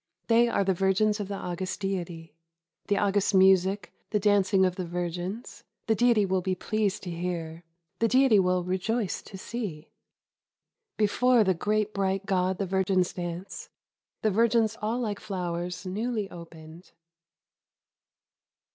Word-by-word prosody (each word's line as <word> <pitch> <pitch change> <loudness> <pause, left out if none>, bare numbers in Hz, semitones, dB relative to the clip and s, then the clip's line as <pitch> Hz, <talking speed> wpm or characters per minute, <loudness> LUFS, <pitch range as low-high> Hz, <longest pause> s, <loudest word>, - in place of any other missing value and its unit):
They 235 +1 +5
are 200 - +1
the 190 0 +2
virgins 195 +3 +1
of 205 - -3
the 200 - -4
august 185 0 -4
Deity. 175 -5 -4 0.3
" 165 0 -47
The 205 - +1
august 200 0 +1
music, 190 +1 +4 0.2
the 210 - +1
dancing 195 -2 +3
of 180 -1 0
the 185 - -3
virgins, 180 +5 -5
— - - -54
the 225 - +2
Deity 225 -1 +3
will 190 -1 0
be 185 +1 -1
pleased 210 +1 -1
to 180 - -5
hear, 170 -1 -4 0.4
the 230 - +3
Deity 255 -3 +5
will 180 -1 +2
rejoice 190 +4 -1
to 195 - -11
see. 190 -8 -6 1.1
^'Before 230 +2 +3
the 190 - +3
great 210 +4 -1
bright 195 0 -1
God 185 -2 0
the 200 - -1
virgins 190 -1 +1
dance, 175 +1 -6 0.3
— - - -64
the 215 - +3
virgins 225 +1 +2
all 220 +3 -1
like 210 -4 -2
flowers 180 -3 -4
newly 215 +2 -2
opened." 165 0 -12
190 Hz, 150 wpm, -27 LUFS, 180-215 Hz, 1.1 s, They